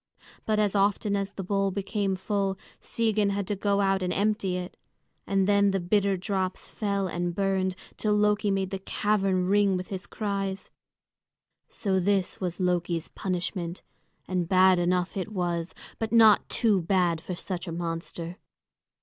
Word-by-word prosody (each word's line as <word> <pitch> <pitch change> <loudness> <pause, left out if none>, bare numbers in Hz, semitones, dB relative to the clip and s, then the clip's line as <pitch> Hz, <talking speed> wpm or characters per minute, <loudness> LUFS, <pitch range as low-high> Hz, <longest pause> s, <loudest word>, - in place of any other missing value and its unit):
But 215 -1 +2
as 210 -2 +2
often 200 0 +2
as 200 0 -2
the 195 - -5
bowl 195 +1 +1
became 200 0 -1
full, 195 0 -1 0.2
Sigyn 215 -3 0
had 200 0 -1
to 205 - -2
go 200 +1 +1
out 195 -1 +2
and 180 -1 -1
empty 200 -2 0
it; 180 0 -6 0.5
and 195 -1 +2
then 200 0 +4
the 195 0 0
bitter 195 +2 +1
drops 190 -1 -2
fell 200 -2 -1
and 175 -1 -2
burned 190 -1 0 0.2
till 210 -1 +1
Loki 210 0 +2
made 195 -1 0
the 195 - -3
cavern 195 -2 0
ring 200 0 +3
with 185 - -6
his 190 -1 -5
cries. 195 -2 -3 1.0
So 190 -3 0
this 195 0 0
was 180 -1 -3
Loki's 175 -2 0
punishment, 180 -1 -3 0.4
and 180 -2 -1
bad 185 -1 +5
enough 180 +1 0
it 195 +2 -3
was, 175 -3 -2 0.2
but 225 -1 -2
not 220 -2 +6
too 210 -6 +2
bad 175 -2 +1
for 180 +1 -5
such 180 +1 -5
a - - -4
monster. 165 +1 -5
195 Hz, 160 wpm, -27 LUFS, 180-200 Hz, 1.0 s, not